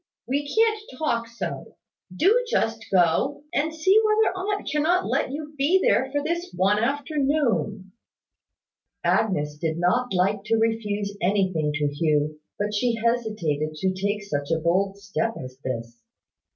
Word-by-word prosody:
We 285 +3 -1
can't 440 -1 +3 0.2
talk 235 -7 0
so. 230 0 -6 0.3
Do 405 - +3
just 225 - 0
go, 185 - +2
and 315 0 +1
see 375 +7 +4
whether 430 -1 +3
aunt 405 +2 -3
cannot 315 +5 +2
let - - 0
you 300 +2 -6
be 295 +7 +3
there 265 -7 +2
for 290 0 -1
this 340 +3 -2
one 195 +3 +3
afternoon." 275 - 0 1.1
Agnes 175 -6 +1
did 160 0 -1
not 240 +9 +1
like 195 +2 +1
to 225 +1 +2
refuse 210 -3 -1
anything 185 -5 +1
to 150 -1 0
Hugh: 150 0 0 0.2
but 210 +1 -2
she 230 +3 +1
hesitated 215 -11 -1
to 185 +4 0
take 205 +2 -2
such 145 -7 -3
a 165 - +2
bold 190 +5 +1
step 205 +3 -2
as 130 0 -9
this. 115 -2 -5
210 Hz, 145 wpm, -25 LUFS, 175-290 Hz, 1.1 s, see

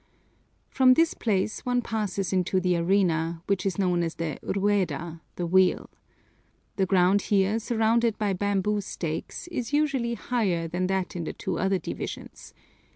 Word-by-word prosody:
From 255 -1 +5
this 330 +2 +3
place 210 -1 -1
one 245 -1 0
passes 200 -4 -2
into 185 0 +1
the 180 -1 +1
arena, 170 -2 +1
which 200 0 0
is 190 - -2
known 180 -3 +1
as 165 -1 -2
the 165 -3 -4
Rueda, 175 -5 -1
the 175 - -2
wheel. 185 +2 +2 0.9
The 190 -1 +2
ground 190 +1 +4
here, 205 +2 +2
surrounded 230 0 +1
by 205 -2 0
bamboo 205 +2 0
stakes, 165 - -5
is 255 -6 -4
usually 275 -6 +1
higher 200 -8 -1
than 180 +2 -1
that 190 -1 -2
in 170 -2 -3
the - - -4
two - - -4
other 190 +1 +2
divisions. - - -7
195 Hz, 155 wpm, -26 LUFS, 180-220 Hz, 0.9 s, From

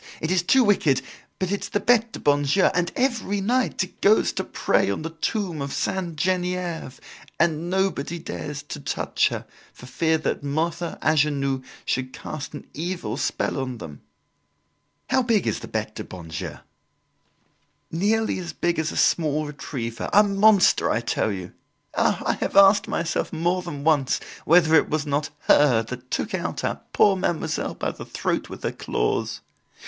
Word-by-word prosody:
It 160 - -2
is 185 -1 +3
too 255 +9 +4
wicked, 170 - +3 0.3
but 185 0 -2
it's 200 - -2
the 205 - 0
Bete 230 -1 +3
du - - -6
bon 145 0 +3
Dieu, 145 +7 +2
and, 180 -1 0
every 240 -6 0
night, 240 +1 +1
it 185 - -11
goes 210 +2 +4
to - - -2
pray - - +1
on 100 - -2
the 165 - -4
tomb 175 -1 -2
of 140 0 -3
Sainte 180 -4 -2
Genevieve 180 -4 -2 0.4
and 165 0 +1
nobody 185 -4 0
dares 90 - -6
to - - -7
touch - - 0
her, - - -4 0.3
for - - -14
fear 160 +5 +1
that 155 - -2
Mother 160 +4 -2
Angenoux 140 -3 +2 0.2
should 130 0 -2
cast 150 -1 -7
an - - -8
evil 165 -9 -3
spell 135 - -1
on 130 -2 -3
them." 75 -9 -9 1.1
"How 260 - +4
big 230 -5 +2
is - - 0
the - - -8
Bete 110 -1 -3
du - - -6
bon 85 -3 -10
Dieu?" 80 - -5 1.3
"Nearly 210 +5 +1
as 175 -3 -6
big 175 0 0
as 160 0 -1
a - - -6
small 155 -2 +2
retriever, 130 -5 -5
a 210 - +7
monster, 200 -1 +4
I 115 - +1
tell 115 -1 0
you. 95 -2 -6 0.4
Ah! - - +1
I - - +2
have - - -2
asked 200 +1 +7
myself 170 0 -1
more 175 +3 0
than 155 -6 -6
once 145 -4 +2 0.3
whether 160 0 +5
it 160 - +5
was 155 0 -1
not 145 +1 -1
her 125 -6 +4
that 125 +2 -8
took 220 - -2
our 180 -1 -2 0.4
poor 200 -2 +4
Mademoiselle 175 -3 -2
by - - -2
the - - -9
throat - - -2
with - - -9
her - - 0
claws. - - -2
165 Hz, 175 wpm, -24 LUFS, 140-185 Hz, 1.3 s, a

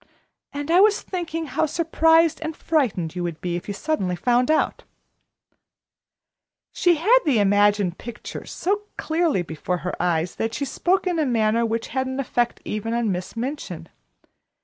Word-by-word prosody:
And 290 +2 -4
I 350 - +6
was 420 0 +5
thinking 330 -3 -4
how 310 +2 0
surprised 325 0 +3
and 320 -1 -4
frightened 215 - 0
you 180 - -3
would 170 -2 -4
be 175 -1 -3
if 175 - -6
you 205 - -3
suddenly 195 - -1
found 245 - +2
out 315 - +1 1.3
" - - -65
She 350 -1 +3
had 430 +11 +5
the 285 -7 +2
imagined 205 -2 +3
picture 240 -1 -8
so 405 +3 -1 0.2
clearly 320 - +1
before 170 +2 -3
her 180 - -2
eyes, 170 -1 0
that 225 0 -2
she 285 - -2
spoke 365 +8 0
in 355 -3 0
a 310 - +2
manner 230 -1 +2
which 230 +1 -3
had 260 +1 -1
an 260 +1 -4
effect 240 -3 -1
even 225 +2 -3
on 235 -3 +1
Miss 185 +4 -5
Minchin. 270 +6 -5
245 Hz, 170 wpm, -23 LUFS, 205-320 Hz, 1.3 s, I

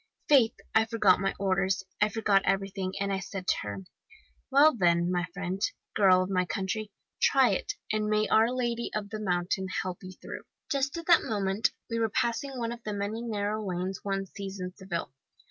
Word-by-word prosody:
"Faith, 260 -6 +5 0.2
I 220 0 +5
forgot 215 -5 +3
my 195 0 -1
orders, 190 0 +1 0.2
I 210 - +4
forgot 210 -2 +2
everything, 195 -1 -1
and 200 0 0
I 190 - 0
said 195 -1 -6
to - - +4
her, 100 -1 -5 0.7
'Well, 285 +2 +6
then, 175 -3 +3
my 175 -1 0
friend, 190 0 -4 0.3
girl 185 -3 +5
of 185 - -5
my 185 -1 +2
country, 200 +4 -3 0.3
try - - +5
it, - - -1 0.2
and 215 0 0
may 215 0 +2
our 225 +1 +4
Lady 240 -2 -1
of 205 -1 -3
the 215 - -4
Mountain 185 -1 -1 0.2
help 185 -1 -5
you 185 -1 -9
through.' - - -9 0.3
"Just 275 +2 0
at 335 - -6
that 340 -1 +6
moment 200 0 +1 0.2
we 230 -1 -2
were 225 -1 +1
passing 260 +6 -1
one 230 -1 -2
of 240 0 -7
the 210 - -3
many 205 +3 -3
narrow 215 -2 -2
lanes 185 0 -3
one 195 -1 -1
sees 195 0 -7
in 180 0 -5
Seville. 180 -8 -5
200 Hz, 195 wpm, -29 LUFS, 190-225 Hz, 0.7 s, Well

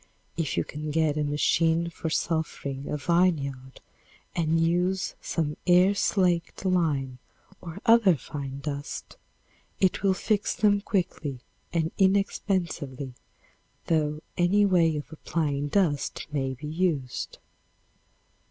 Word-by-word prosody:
If 160 -3 -2
you - - +2
can 150 +1 -6
get 155 -1 +1
a 150 - 0
machine 165 +3 +2
for 165 0 -4
sulphuring 150 -4 -2
a 150 - -1
vineyard 140 -6 0 0.5
and 165 -1 +2
use 180 +3 +1
some 150 -3 -2
air 180 +2 +6
slaked 185 -3 +1
lime 145 -8 +1 0.4
or 165 -2 -8
other 225 -6 +6
fine 140 -1 -6
dust, 145 -1 -5 0.6
it 190 - +2
will 195 -1 +3
fix 210 +1 0
them 205 -1 +3
quickly 160 - -2 0.3
and 165 -1 0
inexpensively, 180 -8 0 0.7
though 155 -2 0 0.2
any 200 +4 +4
way 170 -5 +3
of 145 - -7
applying 150 -3 -1
dust 145 -4 0
may 135 -2 -1
be 140 +4 -9
used. 155 -6 -2
160 Hz, 115 wpm, -27 LUFS, 145-180 Hz, 0.7 s, air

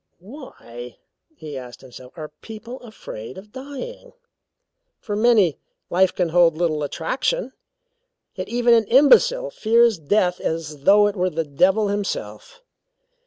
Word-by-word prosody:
"Why," 165 - -11 0.4
he 155 - -9
asked 125 -2 -9
himself, 130 -1 -13
"are 155 -1 -8
people 230 +3 -9
afraid 130 - -10
of 205 +2 -12
dying? 285 - -9 0.9
For 205 - -5
many, 210 - +3 0.3
life 185 +1 +3
can 180 -2 -1
hold 165 -1 +3
little 160 -3 0
attraction, 255 - -2 0.8
yet - - -6
even 240 0 +3
an 225 -1 +4
imbecile 485 - +4
fears 230 - +2
death 180 +3 +1
as 155 -3 -5
though 205 +1 +6
it 205 0 -1
were 185 -1 0
the 165 -1 -2
devil 190 +9 +2
himself. 205 - -5
200 Hz, 130 wpm, -22 LUFS, 160-235 Hz, 0.9 s, though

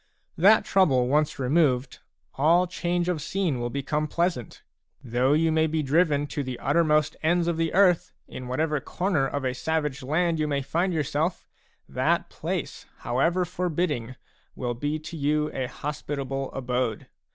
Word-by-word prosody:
That 205 +6 +5
trouble 135 -10 +3
once 150 +3 +1
removed, 130 -2 +1 0.3
all 165 +6 +4
change 175 -1 -2
of 175 -4 -1
scene 175 -5 -1
will 120 0 -2
become 145 +4 -2
pleasant; 170 - -2 0.4
though 125 +3 +1
you 160 +1 +3
may 160 0 +3
be 155 0 -1
driven 145 0 +2
to 145 - -4
the 130 -3 -5
uttermost 155 0 +2
ends 170 +2 +2
of 170 - +1
the 165 0 0
earth, 180 -2 +4 0.2
in 130 - -8
whatever 150 +4 0
corner 175 -2 -1
of 140 0 -3
a 130 - 0
savage 150 0 -2
land 160 +5 0
you 155 - +1
may 140 -2 -1
find 175 +7 0
yourself, 155 +2 -1 0.4
that - - 0
place, - - -4
however 165 +9 +1
forbidding, 170 -8 -2 0.4
will 120 -2 -2
be 145 +6 -2
to 155 +2 -9
you 150 0 0
a 130 -1 -2
hospitable 140 -2 -4
abode. 125 -4 -2
150 Hz, 155 wpm, -26 LUFS, 135-170 Hz, 0.4 s, That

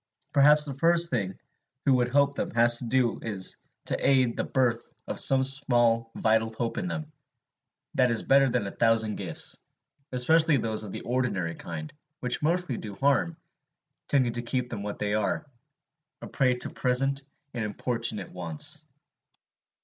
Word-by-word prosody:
Perhaps 150 +1 +5
the 140 - -4
first 170 +4 +2
thing 110 -7 0
one 95 - -12 0.5
who 135 - +4
would 125 -1 +2
help 140 +2 +2
them - - -3
has 120 0 +5
to - - -2
do 125 0 +1
is 100 -4 -2 0.3
to - - 0
aid 130 -3 +3
the - - -1
birth 120 -3 0
of - - -4
some 135 -1 +4
small 120 -4 +2
vital 110 0 +1
hope 115 +1 -3
in 185 - -3
them; 155 -3 -5 0.8
that 125 -1 +3
is 115 -2 0
better 135 0 +4
than 120 -4 0
a 100 - -4
thousand 115 -2 +1
gifts, - - -4 0.5
especially 155 +4 +4
those 110 -2 -1
of 105 - -7
the - - -6
ordinary 110 -9 -1
kind, 80 -2 -7 0.3
which 125 0 0
mostly 165 -4 0
do 105 -2 -7
harm, 130 -11 +1 0.7
tending 130 -4 +2
to 120 - -1
keep 125 +1 -3
them 110 -4 -4
what 105 0 -5
they 105 0 -2
are, 110 +9 -1 0.7
a - - -8
prey 130 -3 +1
to 125 - -3
present 135 +2 +1 0.3
and 120 -3 -3
importunate 110 -2 -2
wants. 85 -4 -5
120 Hz, 165 wpm, -27 LUFS, 110-135 Hz, 0.8 s, Perhaps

